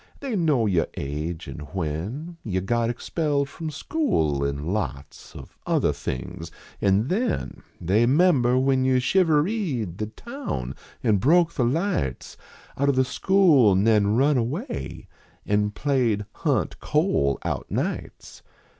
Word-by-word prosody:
They 270 -5 -3
know 150 - +2
your 90 -6 +1
age, 75 +4 -4
and - - -7
when 100 - -4
Von 95 -3 -2
got 120 +1 +1
expelled 140 +3 -1
from 160 +3 -6
school, 140 - 0
and 70 +5 -2
lots 70 -9 -5
Of - - -12
other - - +2
things, 85 +6 -6 0.3
an 100 +4 +2
then 225 - -2 0.2
They 105 +7 +2
member 135 -4 +4
when 130 0 +2
3 130 0 +2
011 125 - +3
shivereed 155 - +1
The 105 - -2
town 230 - -6 0.3
an 105 -2 +3
broke 165 - +3
the 125 - +1
lights 140 - -1 0.4
(hit 140 0 +3
of 140 - +2
the 130 0 +3
school 150 - +4
nen 105 +1 +3
run 140 +3 +3
away 160 - -4 0.4
An 105 0 +1
played 115 -3 0
" - - -46
Hunt - - 0
Cole 70 -1 +1
" - - -16
out - - -3
nights. - - -4
120 Hz, 145 wpm, -24 LUFS, 95-155 Hz, 0.4 s, member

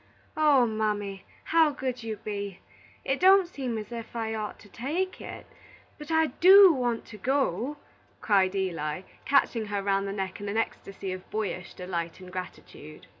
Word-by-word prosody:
"Oh, 295 -5 +5
mammy, 210 -3 -2 0.2
how 325 -1 +4
good 260 -3 -4
you 225 -1 -4
be! 200 -2 -5 0.5
It 270 +1 0
don't 380 0 +6
seem 260 -9 -4
as 215 +1 -7
if 230 0 -7
I 225 -1 -2
ought 215 -1 -4
to - - -15
take 310 - -3
it. - - -8 0.5
But 300 +1 -9
I 320 0 +4 0.2
do 390 -2 +10
want 245 -4 -1
to 215 - -12
go!" 265 - 0 0.4
cried 195 -3 +2
Eli, 170 -4 -2 0.2
catching 240 -5 +2
her 205 -1 -2
round 195 0 +1
the - - -3
neck 195 -1 -4
in 205 - -4
an 210 - -2
ecstasy 195 -3 -3
of 185 0 -9
boyish 205 -4 -4
delight 170 -2 -4
and 185 -1 -11
gratitude. 175 -4 -9
215 Hz, 170 wpm, -28 LUFS, 195-270 Hz, 0.5 s, do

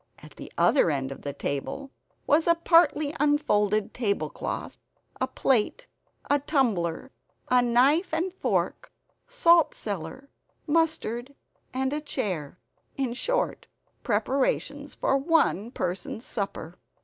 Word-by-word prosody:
At - - -14
the - - -10
other 270 - +4
end 135 -3 -2
of 135 - -8
the 145 - -4
table 145 - -4 0.3
was 315 +3 +3
a 335 - +5
partly 320 -3 +3
unfolded 215 -9 +2
tablecloth, 205 -5 -3 0.4
a - - 0
plate, 265 - 0 0.4
a 285 - +3
tumbler, 250 - 0 0.4
a 250 0 +5
knife 260 +9 +3
and 345 +3 -1
fork, - - -1 0.4
salt 345 -10 +4
cellar, 200 - -6 0.3
mustard 290 -5 0 0.4
and 265 +1 -1
a 300 - -2
chair 185 - -3 0.4
in 260 -3 -1
short, - - -1 0.3
preparations 275 +5 -1
for 270 - +1
one 275 - +2
person's 185 +1 -4
supper. 190 -5 -4
265 Hz, 115 wpm, -27 LUFS, 205-300 Hz, 0.4 s, a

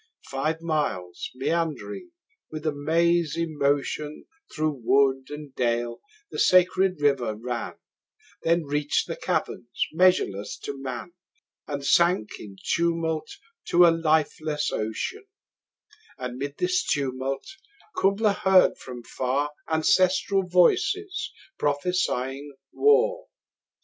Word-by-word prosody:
Five 155 +5 -2
miles 105 - -2
meandering 155 - -2 0.4
with 155 0 -7
a 155 - +2
mazy 165 +2 +1
motion 145 0 -1 0.3
25 - - -13
Through 155 -4 -1
wood 135 +1 +3
and 150 -2 -8
dale 120 -1 -1 0.3
the - - -5
sacred 185 -1 +4
river 135 -7 +1
ran, 120 +1 -4 0.7
Then 170 +1 +2
reach'd 145 0 0
the - - -4
caverns 120 - -2 0.2
measureless 160 - +2
to 140 - -4
man, 130 +6 -6 0.5
And 140 -2 -4
sank 170 - +3
in 100 -2 -10 0.2
tumult 165 -2 0 0.4
to 175 +1 +6
a 170 - +7
lifeless 155 -2 0
ocean: 110 - -3 0.9
And 125 0 -6
'mid 140 +1 -4
this 180 0 +1
tumult 135 -1 -2 0.5
Kubla 200 +2 +2
heard 190 -1 +4
from 125 -2 -9
far 135 +5 -1 0.2
Ancestral 185 +3 +2
voices 395 - +2 0.3
prophesying 145 -3 -1 0.2
war! 475 +4 +3
155 Hz, 110 wpm, -25 LUFS, 135-175 Hz, 0.9 s, a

